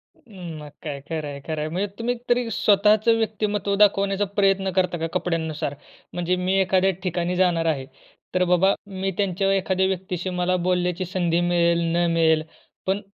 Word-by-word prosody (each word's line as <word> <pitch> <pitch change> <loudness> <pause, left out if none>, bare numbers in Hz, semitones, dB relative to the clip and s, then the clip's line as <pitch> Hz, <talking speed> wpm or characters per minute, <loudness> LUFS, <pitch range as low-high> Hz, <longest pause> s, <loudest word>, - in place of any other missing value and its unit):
उम्म, 175 - -10
मग 150 - -9
काय? 145 -3 -4
खरं 160 -2 -3
आहे 140 -1 -6
खरं 155 -2 -2
आहे. 155 - -2
म्हणजे 185 +5 -1
तुम्ही 240 +2 0
तरी 240 -1 +2
स्वतःचं 215 +3 +4
व्यक्तिमत्त्व 210 -2 -1
दाखवण्याचा 200 0 +3
प्रयत्न 195 -1 +2
करता 180 -2 +1
का 165 0 -2
कपड्यांनुसार? 160 -4 -2 0.4
म्हणजे 175 +1 0
मी 180 +1 -1
एखाद्या 190 0 +3
ठिकाणी 180 -1 -1
जाणार 175 -3 +2
आहे 145 -5 0 0.5
तर 180 - +3
बाबा, 180 +2 +4
मी 195 -1 -3
त्यांच्या 195 -1 +1
एखाद्या 190 -1 +1
व्यक्तीशी 185 -1 -3
मला 180 0 0
बोलण्याची 180 0 0
संधी 175 -2 0
मिळेल 170 -1 +2 0.2
न 175 0 +2
मिळेल, 160 -1 +3 0.4
पण 195 +2 0
185 Hz, 165 wpm, -23 LUFS, 170-195 Hz, 0.5 s, स्वतःचं